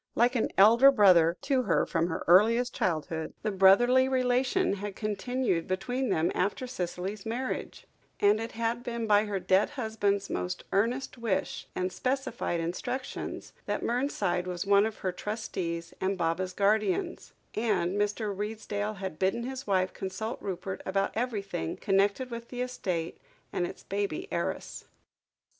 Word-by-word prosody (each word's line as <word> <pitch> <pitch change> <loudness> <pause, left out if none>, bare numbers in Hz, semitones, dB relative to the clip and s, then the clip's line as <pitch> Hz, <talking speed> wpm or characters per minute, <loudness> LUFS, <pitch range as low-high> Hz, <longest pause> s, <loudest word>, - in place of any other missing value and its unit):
Like 240 +2 +4
an 230 - +1
elder 230 +7 +8
brother 180 -9 +5
to 275 -2 +1
her - - +2
from 165 0 0
her 165 - -3
earliest 230 +8 +5
childhood, 160 -2 -2
the 215 - 0
brotherly 240 +7 +5
relation 255 - +2
had 200 0 -5
continued 215 -3 -1
between 245 +7 -1
them 165 -3 +1
after 200 +7 -1
Cicely's 195 -2 -4
marriage, 245 +4 -4 0.3
and 205 +1 +4
it 225 +1 -5
had 230 +1 -1
been 235 -1 -3
by 210 0 +4
her 205 -2 -2
dead 185 +2 +3
husband's 215 -6 -1
most 180 0 -3
earnest 240 +5 0
wish, 200 -5 -2
and 185 0 -2
specified 255 -9 -1
instructions, 245 +10 -4
that - - -1
Mernside 235 -8 0
was 180 0 -3
one 200 +1 +5
of 220 - -7
her 185 - +2
trustees 180 -4 -4
and 190 +1 0
Baba's 180 +2 -1
guardians, 215 - 0 0.2
and 195 -5 0
Mr. 205 0 -1
Redesdale 210 0 -3
had 190 -5 -6
bidden 195 +5 +1
his 265 0 -6
wife 185 -2 +1
consult 205 +5 -5
Rupert 190 0 -4
about 195 +1 0
everything 205 - -3
connected 200 +6 +1
with 235 0 -7
the 250 -1 -4
estate 180 -10 -3 0.3
and 175 - 0
its - - -10
baby 205 - -3
heiress. - - -3
205 Hz, 150 wpm, -29 LUFS, 185-240 Hz, 0.3 s, elder